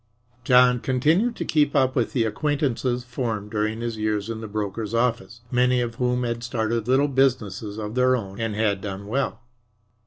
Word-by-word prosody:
John 125 -1 +5
continued 155 - +1
to - - -4
keep 150 -2 +2
up 130 -1 +3
with 120 -4 0
the 120 - +2
acquaintances 130 -1 -1
formed 115 -4 -4
during 110 +1 -1
his 115 -1 -3
years 105 0 -1
in 110 -1 -5
the 110 - -6
broker's 105 +1 -3
office, 120 0 -1
many 125 0 +3
of 120 -1 -2
whom 125 0 +1
had 115 -1 -3
started 115 -2 -1
little 135 +3 +3
businesses 115 -7 0
of 105 -1 -5
their 130 +1 +3
own 100 -3 -5
and 115 -2 -2
had 105 -3 0
done 100 -1 -6
well. 120 +1 -2
120 Hz, 180 wpm, -24 LUFS, 110-125 Hz, -, John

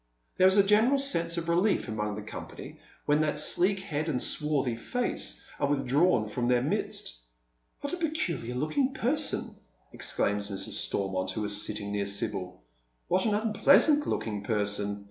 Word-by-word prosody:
There 185 - +6
is 190 +2 +4
a 200 - +7
general 220 +7 +4
sense 170 -12 0
of 170 -1 -3
relief 175 +2 +2
among 105 -1 -3
the 105 - -6
company 105 - -9 0.3
when 150 +1 +3
that 150 -1 0
sleek 185 +5 +3
head 155 -3 -3
and 130 -5 0
swarthy 140 -4 0
face 245 - -3 0.2
are - - +1
withdrawn 140 -2 +2
from 120 +3 -2
their 125 0 +3
midst. - - -3 0.3
" - - -45
What 285 - -4
a - - -1
peculiar 235 - -2
looking 255 - 0
person 285 +5 0
1 - - -20 0.2
" - - -38
exclaims 100 0 -1
Mrs. 100 -2 -2
Stormont, 95 -1 0
who 105 +3 -3
is 105 0 +1
sitting 105 -1 -4
near 100 -1 -1
Sibyl. 100 - -3 0.5
"What 185 +1 +2
an 210 - +2
unpleasant 280 +7 +4
looking 105 -2 -2
person 105 -1 0
140 Hz, 170 wpm, -28 LUFS, -, 0.5 s, a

